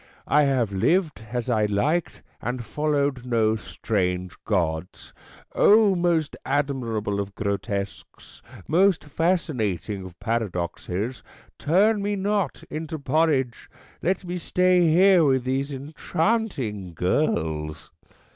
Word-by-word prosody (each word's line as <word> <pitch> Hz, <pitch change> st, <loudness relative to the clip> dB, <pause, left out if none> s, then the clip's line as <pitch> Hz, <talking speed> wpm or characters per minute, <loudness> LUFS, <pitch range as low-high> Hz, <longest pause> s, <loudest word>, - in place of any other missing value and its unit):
I 150 Hz, 0 st, +4 dB
have 130 Hz, -6 st, +1 dB
lived 155 Hz, -, +1 dB
as 120 Hz, -1 st, -2 dB
I 110 Hz, -4 st, +2 dB
liked, 145 Hz, +12 st, 0 dB, 0.2 s
and 120 Hz, 0 st, -3 dB
followed 140 Hz, 0 st, 0 dB
no 115 Hz, -3 st, +2 dB
strange 90 Hz, -4 st, -2 dB
gods. 85 Hz, -4 st, -2 dB, 0.4 s
O, 210 Hz, -1 st, +5 dB
most 170 Hz, -4 st, +1 dB
admirable 120 Hz, -8 st, -1 dB
of 100 Hz, -1 st, -4 dB
grotesques, 100 Hz, -1 st, -4 dB, 0.3 s
most 185 Hz, +3 st, +3 dB
fascinating 130 Hz, -, -1 dB
of 90 Hz, -2 st, -11 dB
paradoxes, 105 Hz, +1 st, -3 dB, 0.4 s
turn 200 Hz, +7 st, +3 dB
me 205 Hz, +1 st, -1 dB
not 200 Hz, 0 st, -1 dB
into 160 Hz, 0 st, -4 dB
porridge. 140 Hz, -3 st, 0 dB, 0.3 s
Let 185 Hz, +1 st, 0 dB
me 180 Hz, 0 st, -4 dB
stay 180 Hz, 0 st, +3 dB
here 180 Hz, +2 st, +6 dB
with 130 Hz, -3 st, +2 dB
these 135 Hz, +2 st, -1 dB
enchanting 140 Hz, -, -2 dB
girls." 80 Hz, -, -1 dB
130 Hz, 110 wpm, -24 LUFS, 105-165 Hz, 0.4 s, here